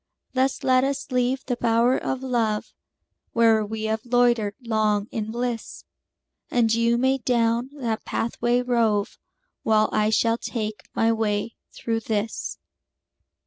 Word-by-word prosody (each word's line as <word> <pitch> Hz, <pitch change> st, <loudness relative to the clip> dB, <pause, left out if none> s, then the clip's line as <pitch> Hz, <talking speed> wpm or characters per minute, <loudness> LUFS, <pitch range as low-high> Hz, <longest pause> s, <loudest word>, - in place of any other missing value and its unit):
Thus 265 Hz, +1 st, 0 dB
let 255 Hz, 0 st, +4 dB
us 275 Hz, 0 st, -2 dB
leave 255 Hz, +1 st, 0 dB
the 250 Hz, -, -1 dB
bower 235 Hz, +2 st, +3 dB
of 265 Hz, 0 st, -3 dB
love, 230 Hz, -5 st, -1 dB, 0.6 s
Where 225 Hz, -2 st, +4 dB
we 215 Hz, +1 st, -5 dB
have 220 Hz, +1 st, -1 dB
loitered 240 Hz, -4 st, +2 dB
long 215 Hz, -4 st, +1 dB
in 220 Hz, -1 st, -3 dB
bliss; 240 Hz, 0 st, -4 dB, 0.7 s
And 230 Hz, -2 st, +2 dB
you 230 Hz, +1 st, +2 dB
may 265 Hz, +2 st, +2 dB
down 235 Hz, 0 st, +1 dB
that 230 Hz, -4 st, -2 dB
pathway 240 Hz, +2 st, 0 dB
rove, 225 Hz, -4 st, +1 dB, 0.4 s
While 215 Hz, -1 st, +3 dB
I 215 Hz, 0 st, +2 dB
shall 230 Hz, +1 st, +2 dB
take 215 Hz, -3 st, -5 dB
my 225 Hz, 0 st, +3 dB
way 220 Hz, 0 st, -1 dB, 0.2 s
through 225 Hz, -1 st, -2 dB
this. 220 Hz, 0 st, -3 dB
230 Hz, 135 wpm, -24 LUFS, 220-245 Hz, 0.7 s, let